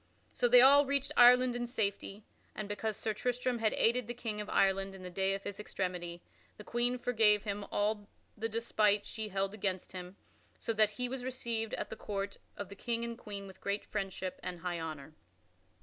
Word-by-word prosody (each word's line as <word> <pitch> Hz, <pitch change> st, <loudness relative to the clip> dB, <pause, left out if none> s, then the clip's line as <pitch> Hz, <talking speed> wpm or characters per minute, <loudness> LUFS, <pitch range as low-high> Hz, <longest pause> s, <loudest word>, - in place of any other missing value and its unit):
So 245 Hz, -, +2 dB
they 245 Hz, +1 st, +8 dB
all 280 Hz, +2 st, +7 dB
reached 280 Hz, 0 st, +1 dB
Ireland 250 Hz, 0 st, +7 dB
in 240 Hz, 0 st, -2 dB
safety, 205 Hz, -3 st, -2 dB, 0.3 s
and, 215 Hz, -, -4 dB
because 205 Hz, +1 st, -3 dB
Sir 220 Hz, -, -1 dB
Tristram 245 Hz, +2 st, -1 dB
had 220 Hz, -1 st, +2 dB
aided 235 Hz, 0 st, +2 dB
the 240 Hz, -, -5 dB
King 220 Hz, -3 st, -4 dB
of 210 Hz, -, -7 dB
Ireland 195 Hz, 0 st, +2 dB
in 190 Hz, -, -11 dB
the 180 Hz, -, -7 dB
day 195 Hz, +2 st, +1 dB
of 195 Hz, -, -7 dB
his 200 Hz, -, -6 dB
extremity, 180 Hz, -4 st, -4 dB, 0.3 s
the 210 Hz, -, -9 dB
Queen 240 Hz, +3 st, 0 dB
forgave 220 Hz, -4 st, +4 dB
him 205 Hz, -1 st, -3 dB
all 205 Hz, 0 st, 0 dB, 0.3 s
the 225 Hz, +2 st, -3 dB
despite 215 Hz, -2 st, +2 dB
she 220 Hz, -1 st, -5 dB
held 195 Hz, 0 st, -1 dB
against 190 Hz, -3 st, -2 dB
him, 180 Hz, 0 st, -8 dB, 0.4 s
so 230 Hz, -, -2 dB
that 215 Hz, -1 st, +4 dB
he 250 Hz, +4 st, -2 dB
was 255 Hz, 0 st, -4 dB
received 235 Hz, -3 st, -2 dB
at -, -, -5 dB
the -, -, -4 dB
court 200 Hz, -2 st, -4 dB, 0.2 s
of 200 Hz, -2 st, -5 dB
the 200 Hz, -, -9 dB
King 235 Hz, +3 st, -2 dB
and 235 Hz, 0 st, -4 dB
Queen 205 Hz, -4 st, -7 dB
with 190 Hz, -1 st, -13 dB
great 200 Hz, +1 st, -2 dB
friendship 190 Hz, -2 st, -4 dB
and 180 Hz, -2 st, -6 dB
high 175 Hz, -1 st, -2 dB
honor. 155 Hz, -2 st, -6 dB
210 Hz, 200 wpm, -33 LUFS, 195-235 Hz, 0.4 s, they